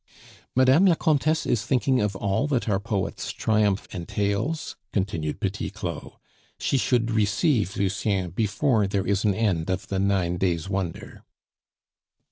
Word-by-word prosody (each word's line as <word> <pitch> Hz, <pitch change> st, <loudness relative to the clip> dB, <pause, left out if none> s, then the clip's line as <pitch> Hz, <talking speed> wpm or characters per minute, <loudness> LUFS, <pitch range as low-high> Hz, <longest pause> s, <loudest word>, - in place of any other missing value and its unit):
"Madame 130 Hz, +9 st, +5 dB
la 175 Hz, -, +5 dB
Comtesse 155 Hz, 0 st, +1 dB
is 110 Hz, -4 st, +1 dB
thinking 130 Hz, +2 st, +1 dB
of 105 Hz, -1 st, -1 dB
all 100 Hz, +8 st, 0 dB
that 135 Hz, -6 st, 0 dB
our 100 Hz, -3 st, +1 dB
poet's 100 Hz, -2 st, -3 dB
triumph 105 Hz, -3 st, +1 dB
entails?" 100 Hz, -, -2 dB, 0.2 s
continued 80 Hz, -6 st, -2 dB
Petit -, -, -2 dB
Claud. -, -, -6 dB, 0.4 s
"She -, -, -1 dB
should 120 Hz, -3 st, +1 dB
receive 105 Hz, -, +1 dB
Lucien 95 Hz, -2 st, 0 dB
before 110 Hz, -, +1 dB
there 95 Hz, -1 st, -1 dB
is 100 Hz, 0 st, +1 dB
an 100 Hz, -2 st, +2 dB
end 95 Hz, -7 st, 0 dB
of 95 Hz, +1 st, -2 dB
the 95 Hz, -, -1 dB
nine 95 Hz, -3 st, +1 dB
days' 85 Hz, -2 st, 0 dB
wonder." 95 Hz, -3 st, -4 dB
100 Hz, 140 wpm, -25 LUFS, 95-120 Hz, 0.4 s, Madame